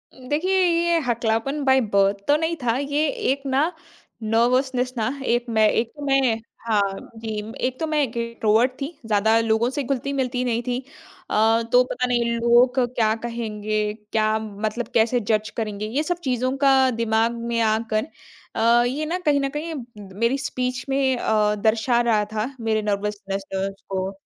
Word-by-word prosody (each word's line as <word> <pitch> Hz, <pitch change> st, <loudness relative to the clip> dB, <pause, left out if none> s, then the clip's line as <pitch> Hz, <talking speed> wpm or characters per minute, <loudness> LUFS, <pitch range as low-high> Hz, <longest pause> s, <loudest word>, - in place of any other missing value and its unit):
देखिए, 310 Hz, +9 st, 0 dB
ये 340 Hz, 0 st, +2 dB
हकलापन 235 Hz, +5 st, 0 dB
by 265 Hz, 0 st, +5 dB
birth 200 Hz, 0 st, +3 dB
तो 290 Hz, -, +5 dB
नहीं 325 Hz, +1 st, -1 dB
था। 235 Hz, 0 st, +1 dB
ये 285 Hz, +2 st, 0 dB
एक 275 Hz, 0 st, -1 dB
ना 275 Hz, +5 st, +1 dB, 0.5 s
नर्वसनेस 250 Hz, +3 st, +1 dB
ना, 220 Hz, -, 0 dB, 0.2 s
एक 240 Hz, 0 st, +1 dB
मैं 220 Hz, -1 st, +4 dB
एक 230 Hz, 0 st, 0 dB
तो 290 Hz, -, -8 dB
मैं 270 Hz, -5 st, +2 dB, 0.3 s
हाँ, 200 Hz, -3 st, +2 dB, 0.2 s
जी, 220 Hz, -1 st, -5 dB
एक 255 Hz, 0 st, -3 dB
तो 320 Hz, -, -1 dB
मैं 305 Hz, -1 st, +1 dB
इंट्रोवर्ट 235 Hz, 0 st, +1 dB
थी, 275 Hz, -, -1 dB, 0.2 s
ज़्यादा 220 Hz, +1 st, +3 dB
लोगों 225 Hz, +1 st, +1 dB
से 280 Hz, +2 st, -3 dB
घुलती-मिलती 260 Hz, -1 st, -1 dB
नहीं 235 Hz, -1 st, 0 dB
थी। 250 Hz, +1 st, -2 dB, 0.5 s
अ, 225 Hz, +2 st, +3 dB
तो 250 Hz, 0 st, +6 dB
पता 250 Hz, -, -1 dB
नहीं 240 Hz, -1 st, +1 dB, 0.2 s
लोग 240 Hz, +2 st, +4 dB, 0.2 s
क्या 220 Hz, -2 st, +2 dB
कहेंगे, 215 Hz, -2 st, -2 dB, 0.2 s
क्या 215 Hz, 0 st, +2 dB
मतलब 215 Hz, +2 st, -4 dB
कैसे 235 Hz, +2 st, +3 dB
जज़ 215 Hz, -1 st, +1 dB
करेंगे, 210 Hz, -2 st, -3 dB
ये 255 Hz, +8 st, -1 dB
सब 350 Hz, +2 st, -1 dB
चीज़ों 255 Hz, 0 st, 0 dB
का 265 Hz, -1 st, +5 dB
दिमाग 225 Hz, +1 st, +1 dB, 0.2 s
में 230 Hz, -, +1 dB
आकर 220 Hz, +1 st, 0 dB, 0.5 s
अ, 235 Hz, +1 st, +4 dB
ये 290 Hz, +5 st, -2 dB
ना 335 Hz, +4 st, -1 dB
कहीं 290 Hz, -2 st, +3 dB
न 275 Hz, -, 0 dB
कहीं 320 Hz, +2 st, -3 dB, 0.5 s
मेरी 235 Hz, +4 st, +2 dB
स्पीच 255 Hz, -2 st, -3 dB
में 270 Hz, -1 st, +1 dB
अ, 210 Hz, -2 st, +1 dB
दर्शा 220 Hz, +3 st, +2 dB
रहा 220 Hz, -3 st, +2 dB
था 220 Hz, +5 st, -2 dB
मेरे 220 Hz, -1 st, 0 dB
नर्वसनेस 200 Hz, -1 st, -3 dB
लेवेल्स 195 Hz, +1 st, -3 dB
को। 190 Hz, 0 st, -2 dB
235 Hz, 165 wpm, -23 LUFS, 220-265 Hz, 0.5 s, तो